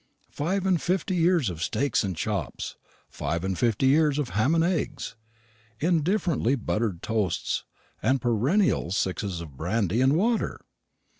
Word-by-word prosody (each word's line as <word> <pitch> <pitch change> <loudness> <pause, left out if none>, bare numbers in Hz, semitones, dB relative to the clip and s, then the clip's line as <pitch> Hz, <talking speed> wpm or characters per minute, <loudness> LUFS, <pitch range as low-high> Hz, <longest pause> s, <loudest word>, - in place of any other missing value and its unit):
Five 185 +6 -1
and 185 -4 +2
fifty 185 +1 0
years 170 - +3
of 80 -2 -8
steaks 120 - +1
and 95 -3 -2
chops; 105 +3 -3 0.3
five 80 +4 -3
and 95 0 -1
fifty 115 +6 +1
years 145 +1 +4
of 145 -5 -1
ham 130 +10 +2
and 165 - +3
eggs, 150 -9 -2 0.6
indifferently 165 - +1
buttered 105 -6 -2
toasts, 105 -6 -1 0.4
and 135 +1 +2
perennial 125 - +2
sixes 95 -2 -1
of 75 -5 -10
brandy 100 - 0
and 135 +2 +4
water! 225 +5 0
130 Hz, 140 wpm, -26 LUFS, 100-165 Hz, 0.6 s, years